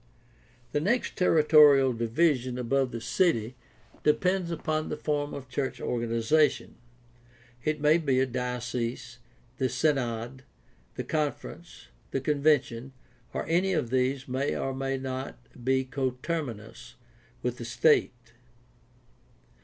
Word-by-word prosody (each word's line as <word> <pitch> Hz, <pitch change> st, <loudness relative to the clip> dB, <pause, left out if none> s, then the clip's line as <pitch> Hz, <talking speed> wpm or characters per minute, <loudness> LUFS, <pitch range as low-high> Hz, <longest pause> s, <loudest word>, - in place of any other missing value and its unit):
— 120 Hz, -, -32 dB
The -, -, +1 dB
next 210 Hz, +11 st, 0 dB
territorial 150 Hz, -6 st, +6 dB
division 125 Hz, +2 st, +1 dB
above 130 Hz, +1 st, 0 dB
the 115 Hz, -, -4 dB
city 120 Hz, -, +1 dB, 0.5 s
depends 180 Hz, +4 st, +1 dB
upon 155 Hz, -1 st, -2 dB
the -, -, -3 dB
form 145 Hz, -1 st, -1 dB
of 135 Hz, -2 st, -7 dB
church 130 Hz, +1 st, -3 dB
organization. 120 Hz, +6 st, +1 dB, 0.9 s
It 155 Hz, 0 st, -1 dB
may 150 Hz, +3 st, +4 dB
be 140 Hz, -5 st, +1 dB
the 130 Hz, -, +3 dB
diocese, 125 Hz, -1 st, -4 dB, 0.4 s
the 130 Hz, -1 st, +1 dB
synod, 125 Hz, -3 st, -1 dB, 0.5 s
the -, -, -3 dB
conference, 150 Hz, -, -4 dB, 0.2 s
the 135 Hz, -, -1 dB
convention, 135 Hz, -3 st, +1 dB, 0.4 s
and -, -, -4 dB
any 180 Hz, +4 st, +2 dB
of 120 Hz, -8 st, -1 dB
these 130 Hz, +1 st, 0 dB
may 130 Hz, +2 st, -1 dB
or 135 Hz, -, -2 dB
may 135 Hz, 0 st, -2 dB
not 130 Hz, 0 st, -5 dB, 0.3 s
be 130 Hz, +1 st, +2 dB
coterminous 130 Hz, -2 st, -4 dB, 0.5 s
with 125 Hz, 0 st, -2 dB
the 120 Hz, -, -5 dB
state. 120 Hz, -3 st, +1 dB
130 Hz, 120 wpm, -28 LUFS, 125-150 Hz, 0.9 s, territorial